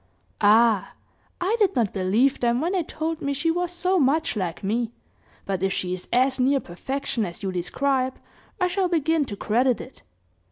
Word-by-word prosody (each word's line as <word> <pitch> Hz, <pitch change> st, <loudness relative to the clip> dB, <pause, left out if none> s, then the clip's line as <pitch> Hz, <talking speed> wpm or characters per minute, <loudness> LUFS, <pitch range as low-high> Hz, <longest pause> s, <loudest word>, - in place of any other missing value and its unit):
"Ah! 215 Hz, 0 st, +4 dB, 0.5 s
I 380 Hz, +5 st, +1 dB
did 395 Hz, -3 st, +3 dB
not 225 Hz, -5 st, +1 dB
believe 210 Hz, +8 st, +2 dB
them, 240 Hz, 0 st, +2 dB
when 335 Hz, +5 st, 0 dB
they 380 Hz, -2 st, +1 dB
told 320 Hz, 0 st, -4 dB
me 280 Hz, 0 st, -1 dB
she 290 Hz, +4 st, 0 dB
was 350 Hz, +1 st, -1 dB
so 360 Hz, +1 st, +1 dB
much 305 Hz, +1 st, +2 dB
like 185 Hz, -4 st, -3 dB
me; 230 Hz, +3 st, -1 dB, 0.5 s
but 190 Hz, -2 st, -2 dB
if 195 Hz, 0 st, +1 dB
she 180 Hz, -1 st, -2 dB
is 185 Hz, -, -6 dB
as 260 Hz, +2 st, +2 dB
near 270 Hz, +2 st, +3 dB
perfection 265 Hz, +6 st, -3 dB
as 175 Hz, 0 st, -6 dB
you 190 Hz, -, -1 dB
describe, 260 Hz, +8 st, 0 dB, 0.4 s
I 365 Hz, -, +3 dB
shall 370 Hz, +1 st, +1 dB
begin 325 Hz, -2 st, +1 dB
to 205 Hz, -, -6 dB
credit 240 Hz, +5 st, +1 dB
it. 255 Hz, -, -11 dB
260 Hz, 185 wpm, -24 LUFS, 210-325 Hz, 0.5 s, Ah